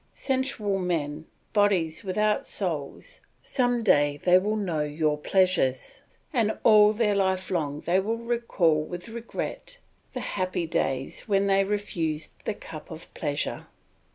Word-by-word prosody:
Sensual 260 -7 -1
men, 160 -4 -2 0.3
bodies 190 -7 +2
without 210 +2 0
souls, 180 - -4 0.2
some 245 -3 +1
day 145 -7 +3
they 180 +4 +5
will 210 +3 -1
know 180 -8 -1
your 150 0 0
pleasures, 165 -5 +1 0.3
and 225 -5 +1
all 210 -1 +7
their 215 -1 +1
life 190 -1 0
long 150 -4 -1
they 180 +3 +2
will 220 +4 -1
recall 230 -9 +1
with 175 +5 -7
regret 235 - -5 0.4
the - - -3
happy 185 -2 -2
days 135 - -2
when 200 -2 +2
they 195 0 +4
refused 175 -6 -2
the - - -1
cup - - -10
of - - -10
pleasure. - - -3
190 Hz, 135 wpm, -26 LUFS, 160-215 Hz, 0.4 s, all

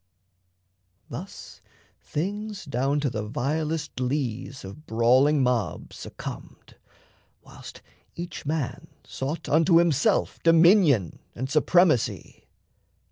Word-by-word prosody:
Thus - - -9 0.4
things 205 +5 -4
Down 140 +1 0
to 140 - 0
the 110 - -3
vilest 150 +7 -3
lees 130 -2 -3
of 140 +11 -11
brawling 130 +6 +3
mobs 125 -4 -2
Succumbed, - - -9 0.7
whilst - - -13 0.3
each 170 -2 -7
man 150 -3 -3 0.2
sought 140 +5 -5
unto 165 +2 +4
himself 170 - +2
Dominion 165 - +4 0.2
and 130 +3 -4
supremacy. 160 -3 +1
150 Hz, 90 wpm, -25 LUFS, 125-165 Hz, 0.7 s, unto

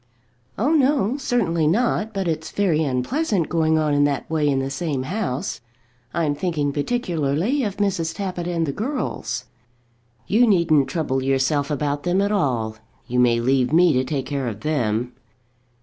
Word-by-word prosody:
"Oh, 255 +9 +1
no; 270 -6 +3
certainly 185 - 0
not. 220 +3 +1
But 195 -3 -2
it's 160 -1 -2
very 170 -6 +1
unpleasant 170 - 0
going 160 -1 +2
on 155 -1 +1
in 145 0 +3
that 140 -3 -1
way 155 -2 +1
in 135 - +1
the 135 0 -2
same 140 -3 -2
house. 155 - -3 0.5
I'm 160 -3 0
thinking 145 -2 -1
particularly 170 - 0
of 205 -4 -3
Mrs. 185 -5 -1
Tappitt 185 -4 -4
and 170 -2 0
the 140 - -2
girls." 225 - -3 0.8
"You 235 +4 +3
needn't 170 -8 +3
trouble 140 -6 -1
yourself 135 +2 +1
about 145 0 -1
them 180 +3 +1
at 200 +1 +1
all. 120 - 0 0.3
You 125 +1 -1
may 120 -1 +4
leave 130 +1 +2
me 170 0 +5
to 130 0 +2
take 135 0 -3
care 140 -3 -2
of 110 -2 -5
them." 125 -4 -1
155 Hz, 165 wpm, -22 LUFS, 135-195 Hz, 0.8 s, me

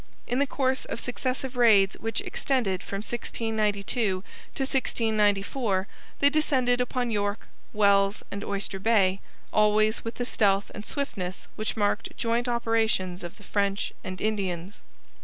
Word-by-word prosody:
In 245 - -1
the 285 - +3
course 265 -2 0
of - - -5
successive 255 +2 -2
raids 215 -5 +5
which 225 0 -2
extended 215 -9 0
from 200 +1 -5
1692 220 -3 -1
to 220 -6 +1 0.5
1694 215 -5 +1 0.3
they 285 - +5
descended 260 -5 +2
upon 250 -1 -1
York, 205 0 -1 0.2
Wells, 200 -1 +3
and 200 +1 -4
Oyster 200 -1 -3
Bay, 195 -3 +3 0.3
always 215 +1 +3
with 230 0 -5
the 245 - -2
stealth 200 -4 +2
and 210 +1 -8
swiftness 190 -10 -4
which 215 +1 -3
marked 205 +1 0
joint 235 +1 0
operations 225 -6 0
of 175 - -7
the 205 - -15
French 200 0 -1
and 185 0 -6
Indians. 195 -3 -2
215 Hz, 140 wpm, -27 LUFS, 200-240 Hz, 0.5 s, raids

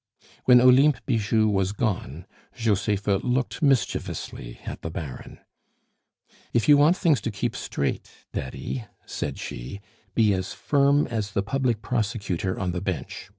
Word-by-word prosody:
When 125 -1 +8
Olympe 130 +3 +6
Bijou 110 -3 +2
was 95 -2 +1
gone, 90 - -2 0.3
Josepha 105 -2 +1
looked 125 - -1
mischievously 125 - -1
at - - -6
the 80 - -4
Baron. 80 -5 -7 1.2
"If 115 - +2
you 145 - +8
want 150 +5 +5
things 155 - +2
to 115 - -2
keep 105 - -3
straight, 70 - -3 0.2
Daddy," 110 - -4 0.2
said - - -4
she, 65 +11 -7 0.4
"be 110 -3 +4
as 95 0 -3
firm 140 0 +3
as 110 -5 -3
the 100 - 0
Public 125 -1 -1
Prosecutor 100 -6 -2
on 90 -2 -1
the 90 0 -3
bench. 95 0 -4
110 Hz, 140 wpm, -25 LUFS, 95-125 Hz, 1.2 s, When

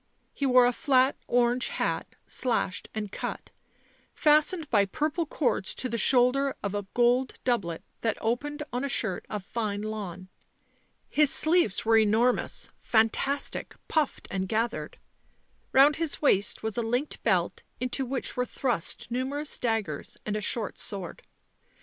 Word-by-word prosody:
He 280 - -1
wore 250 -1 +6
a 245 - +2
flat 265 -1 +3
orange 245 +1 +2
hat, - - -2
slashed 225 -7 -2
and 210 -2 -4
cut, - - -5 0.6
fastened 305 +2 +3
by 205 -3 +4
purple 305 - -2
cords 255 -10 -1
to 255 - -2
the 235 -1 -2
shoulder 260 +4 +4
of 200 -1 -2
a 205 -1 -3
gold 245 +2 +3
doublet 200 -10 -1 0.2
that 225 -2 0
opened 290 +6 -2
on 250 +2 -1
a 280 - -1
shirt 205 -8 -1
of 210 -3 -4
fine 210 -1 -3
lawn; 195 -4 -5 0.8
his 300 -1 +4
sleeves 315 - +3
were 225 0 +5
enor 220 +4 +4
mous, - - -3
fantastic, 235 +5 0
puffed 310 -3 -1
and 190 -1 -2
gathered; 225 +2 -2 0.7
round 280 +2 +6
his 325 -2 0
waist 205 -10 +2
was 220 0 -3
a - - +2
linked 245 +6 -2
belt - - +1 0.2
into 255 +2 -1
which 260 +1 -3
were 250 - +1
thrust 245 -4 -2
numerous 275 +4 -2
daggers 220 -11 -2
and 210 - -2
a 215 - -2
short 215 +1 -3
sword. 190 -4 -6
245 Hz, 150 wpm, -28 LUFS, 215-275 Hz, 0.8 s, wore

